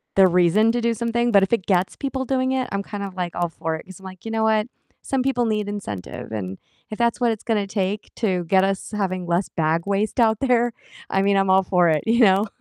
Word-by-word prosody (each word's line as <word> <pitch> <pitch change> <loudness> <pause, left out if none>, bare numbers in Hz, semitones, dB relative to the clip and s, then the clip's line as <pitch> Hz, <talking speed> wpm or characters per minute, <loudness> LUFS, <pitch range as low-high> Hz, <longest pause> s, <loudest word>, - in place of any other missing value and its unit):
the 190 -1 +7
reason 180 +5 +3
to 240 - -1
do 235 0 +1
something, 235 +1 0
but 200 -2 +6
if 195 - -1
it 195 -6 +1
gets 185 -1 +1
people 265 -1 -3
doing 260 0 0
it, 260 -1 -1
I'm 200 0 -2
kind 205 -1 -6
of 190 -2 -7
like 175 -2 -4
all 175 -1 -1
for 160 0 -4
it - - -12
'cause 190 0 -12
I'm 190 - -14
like, 185 -1 -11
you 225 - -4
know 220 0 0
what? 220 0 +2 0.4
Some 265 -2 -1
people 245 -3 +1
need 210 -2 -1
incentive, 110 - -6
and 95 -3 -5 0.3
if 215 - -5
that's 235 +1 +1
what 235 -1 +3
it's 220 - -5
gonna 210 -4 0
take 200 +1 -3
to 185 -6 0
get 190 +2 +3
us 195 +2 -2
having 185 -3 -2
less 175 +3 0
bag 160 +1 0
waste 205 +5 -1
out 220 -2 +3
there, 240 -2 +2 0.4
I 195 - +1
mean, 200 0 +2
I'm 195 -1 +2
all 190 0 +5
for 180 -2 +3
it, 155 -2 +1
you 235 +2 +3
know, 200 0 +5
200 Hz, 250 wpm, -22 LUFS, 185-230 Hz, 0.4 s, the